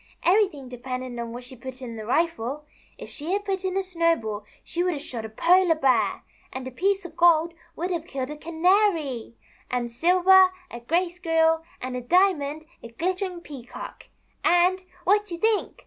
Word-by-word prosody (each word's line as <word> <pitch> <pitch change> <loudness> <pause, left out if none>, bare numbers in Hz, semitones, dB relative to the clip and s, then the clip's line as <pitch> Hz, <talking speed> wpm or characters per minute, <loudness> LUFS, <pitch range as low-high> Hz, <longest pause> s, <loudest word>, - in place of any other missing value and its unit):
" - - -27
Everything 365 -8 +2
depended 250 0 -6
on 235 -1 -4
what 245 +2 -7
she 250 +1 -11
put 255 +1 -9
in 240 -3 -7
the 215 -1 -7
rifle. 300 -1 -1 0.3
If - - -10
she 315 +5 -4
had 405 +1 -1
put 385 -2 -2
in 375 0 -1
a 390 - +1
snowball 330 - 0 0.2
she 345 - -3
would 360 -1 +1
have 285 - -5
shot 230 -6 -6
a - - -6
Polar 345 +8 +4
Bear; 270 -4 +2 0.3
and 260 0 -6
a - - -6
piece 390 +7 0
of 330 -2 -9
gold 340 -1 +4 0.2
would 355 +3 -3
have 340 -2 -3
killed 270 -3 -4
a - - -5
Canary; 320 - +1 0.3
and 240 -1 -2
silver, 370 +6 +5 0.2
a 235 - -7
Gray 340 +9 0
Squirrel; 325 -2 +2 0.2
and 255 0 -5
a 250 - -3
diamond, 315 -1 +2 0.2
a - - -8
glittering 360 - -3
Peacock; 265 -7 -10 0.4
and, 360 +2 +4 0.2
what 415 +3 +2
you 340 - -4
think 435 +2 0
325 Hz, 185 wpm, -25 LUFS, 255-365 Hz, 0.4 s, silver